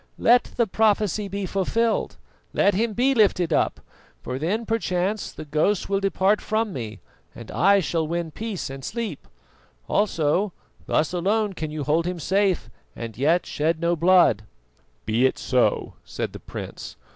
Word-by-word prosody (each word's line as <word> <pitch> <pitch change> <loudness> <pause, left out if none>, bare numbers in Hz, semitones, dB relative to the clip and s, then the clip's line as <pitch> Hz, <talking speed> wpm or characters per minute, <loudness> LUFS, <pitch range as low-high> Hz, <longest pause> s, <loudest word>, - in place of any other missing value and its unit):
Let 245 +1 +5
the 235 - +3
prophecy 210 -1 +1
be 200 0 -3
fulfilled, 215 +5 0 0.4
let 200 - +3
him 220 +3 0
be 255 +5 +2
lifted 185 -8 +3
up, - - +1 0.4
for 130 +1 -4
then 205 +10 -1
perchance 205 -2 -1
the 155 - -9
ghosts 155 +7 +1
will 195 0 +1
depart 195 +1 +2
from 215 -2 -1
me 110 -6 -6 0.3
and - - -10
I 195 +3 +4
shall 160 -2 -1
win 170 0 -2
peace 215 -6 -5
and 135 0 -8
sleep. 215 - -5 0.6
Also, 185 -1 +1 0.3
thus 155 +3 +1
alone 200 +4 +1
can 160 -4 -4
you 150 -1 -4
hold 160 +4 +1
him 180 0 -2
safe 190 +3 +1 0.3
and 115 -2 -6
yet 160 +7 +2
shed 160 +2 -1
no 170 +1 +1
blood." 170 - +4 0.6
"Be 115 +4 +3
it - - -3
so," 125 -2 +1
said - - -5
the - - -8
prince. - - -8
185 Hz, 155 wpm, -24 LUFS, 155-210 Hz, 0.6 s, Let